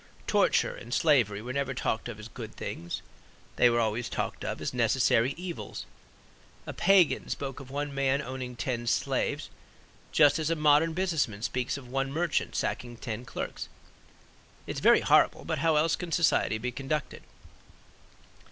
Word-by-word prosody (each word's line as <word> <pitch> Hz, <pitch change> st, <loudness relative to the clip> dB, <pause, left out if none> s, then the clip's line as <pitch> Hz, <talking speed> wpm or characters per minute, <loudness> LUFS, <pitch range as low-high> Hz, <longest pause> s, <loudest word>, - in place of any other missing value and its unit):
Torture -, -, +2 dB
and 120 Hz, -, -11 dB
slavery 120 Hz, -9 st, +2 dB
were 125 Hz, +2 st, -5 dB
never 135 Hz, -1 st, -2 dB
talked 115 Hz, -1 st, -2 dB
of 110 Hz, -2 st, -7 dB
as 105 Hz, -, -8 dB
good -, -, -9 dB
things; 85 Hz, 0 st, -5 dB, 0.5 s
they 120 Hz, -, +6 dB
were 120 Hz, 0 st, +2 dB
always 110 Hz, +1 st, -1 dB
talked -, -, -3 dB
of -, -, -3 dB
as -, -, -3 dB
necessary 120 Hz, +4 st, +2 dB
evils. 175 Hz, -1 st, -6 dB, 0.8 s
A -, -, -6 dB
pagan 190 Hz, -3 st, +3 dB
spoke 135 Hz, -1 st, -4 dB
of 135 Hz, -2 st, -11 dB
one 145 Hz, +1 st, -3 dB
man 140 Hz, 0 st, +1 dB
owning 130 Hz, -2 st, -5 dB
ten 120 Hz, -1 st, -3 dB
slaves 110 Hz, -, -1 dB, 0.6 s
just 145 Hz, 0 st, +5 dB
as 155 Hz, 0 st, -1 dB
a 165 Hz, -, +1 dB
modern 150 Hz, +1 st, +4 dB
business 175 Hz, -5 st, +1 dB
man 105 Hz, -1 st, -10 dB
speaks 125 Hz, +2 st, -1 dB
of 135 Hz, -3 st, -11 dB
one 135 Hz, +2 st, -2 dB
merchant 165 Hz, +1 st, -1 dB
sacking 120 Hz, -1 st, -3 dB
ten 115 Hz, 0 st, -5 dB
clerks: -, -, -5 dB, 1.0 s
"It's -, -, -4 dB
very -, -, +5 dB
horrible; -, -, +3 dB
but -, -, -2 dB
how 160 Hz, +1 st, +3 dB
else 155 Hz, +2 st, +3 dB
can 175 Hz, -2 st, -7 dB
society 160 Hz, -9 st, +2 dB
be 125 Hz, +3 st, -3 dB
conducted?" 135 Hz, +2 st, -3 dB
135 Hz, 160 wpm, -29 LUFS, 120-150 Hz, 1.0 s, they